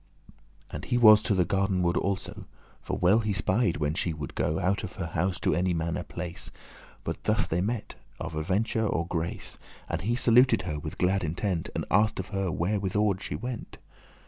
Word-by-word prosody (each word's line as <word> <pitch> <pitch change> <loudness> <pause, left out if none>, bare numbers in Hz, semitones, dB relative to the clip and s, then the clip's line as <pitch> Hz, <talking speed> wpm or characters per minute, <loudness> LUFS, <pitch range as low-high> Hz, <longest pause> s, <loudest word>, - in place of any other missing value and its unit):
* - - -35
*promised - - -24 0.3
And - - -5
he 120 - +1
was 110 -3 +8
to 105 - +1
the 90 -2 +3
garden 95 -1 +1
ward 85 0 +2
also; 95 0 -2 0.4
For - - -3
well 95 +5 +4
he 105 -2 -1
spied 95 0 +1
when 75 -1 0
she 85 -1 -1
woulde 75 -4 -6
go 80 - 0
Out 95 +3 0
of 95 - -6
her 90 - -4
house, 90 +3 -1
to - - +2
any 90 0 +1
manner 85 +1 -1
place; 85 0 -6 0.5
But - - -5
thus - - +2
they 85 +2 -1
met, 110 +3 -2 0.3
of - - -5
aventure 100 +8 0
or 85 -4 0
grace, 85 -1 -4 0.3
And 85 - -2
he 115 +6 0
saluted 120 -3 +5
her 75 -4 -3
with 75 +1 -7
glad 95 +1 +2
intent, 85 +1 -2
And - - -2
asked 105 +2 +3
of 95 - -5
her 95 -3 -1
whitherward 100 +2 0
she - - -4
went. 125 -1 -6
95 Hz, 200 wpm, -28 LUFS, 85-105 Hz, 0.5 s, was